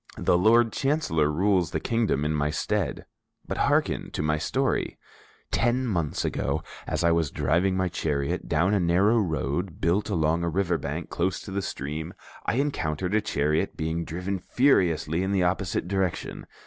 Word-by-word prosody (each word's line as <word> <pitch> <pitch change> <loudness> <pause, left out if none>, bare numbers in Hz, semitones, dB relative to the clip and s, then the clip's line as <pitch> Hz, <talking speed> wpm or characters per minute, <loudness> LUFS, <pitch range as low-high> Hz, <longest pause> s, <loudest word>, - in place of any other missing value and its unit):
The - - +2
Lord 110 +5 +4
Chancellor 135 - +1
rules 90 0 +2
the - - -2
kingdom 110 -11 0
in 75 - 0
my 75 -1 0
stead. 90 +3 -2 0.4
But - - -3
hearken - - +1
to - - -2
my 75 0 +1
story. - - -1 0.5
"Ten 120 +2 +1
months 85 - -1
ago, - - -1 0.2
as - - -1
I 85 - +4
was 85 -3 +2
driving 85 +8 +1
my 95 0 +1
chariot 70 -5 -2
down 90 +6 +2
a 100 - +3
narrow 95 +6 +3
road 80 - -2
built 95 +6 +1
along 85 -2 +1
a 85 - 0
river 90 -1 0
bank 75 +4 -5
close 90 +2 0
to 95 - -9
the 100 +1 -1
stream, 80 +3 -5 0.3
I - - +1
encountered 95 - -1
a 110 - +3
chariot 75 -6 0
being 80 +1 -2
driven 90 +4 -3
furiously 90 - +2
in 95 +1 -1
the 95 -2 +2
opposite 90 -1 -1
direction. 95 -2 -2
90 Hz, 170 wpm, -26 LUFS, 80-100 Hz, 0.5 s, Lord